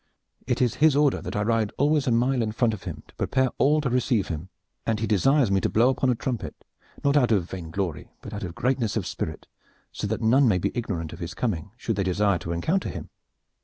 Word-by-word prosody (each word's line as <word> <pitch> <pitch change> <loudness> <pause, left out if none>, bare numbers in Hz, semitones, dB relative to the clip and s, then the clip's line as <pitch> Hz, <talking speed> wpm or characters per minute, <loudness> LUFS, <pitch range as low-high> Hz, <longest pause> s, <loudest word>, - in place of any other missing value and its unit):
It 125 0 +1
is 120 - +1
his 155 -2 +6
order 145 -2 +3
that - - -6
I 105 - +1
ride 110 -1 +1
always 145 0 +2
a - - +3
mile 125 +2 +2
in 110 -1 -1
front 115 0 +2
of 105 - -8
him - - -6
to - - -20
prepare 130 -1 +1
all 150 +2 +4
to 135 - -1
receive 120 -4 +1
him, 85 +2 -5 0.3
and 110 -2 0
he 110 - 0
desires 120 - +3
me 95 -1 +3
to - - +1
blow 120 +4 +4
upon 130 0 +1
a 125 - +3
trumpet 120 0 -4 0.5
not 140 0 +3
out 125 -5 +4
of 95 -6 +2
vainglory, 90 -1 -4
but - - -8
out 105 - -5
of 90 -2 -5
greatness 125 -4 0
of - - -2
spirit, - - -5 0.5
so - - -4
that 110 +1 -2
none 130 +4 +5
may 100 -5 +3
be 90 - -1
ignorant 90 -10 -3
of - - -10
his 85 -1 -6
coming 95 -1 -2
should 115 -4 -2
they 100 - +1
desire 95 0 +1
to 85 - -5
encounter 160 - 0
him." - - -7
115 Hz, 240 wpm, -25 LUFS, 95-130 Hz, 0.5 s, his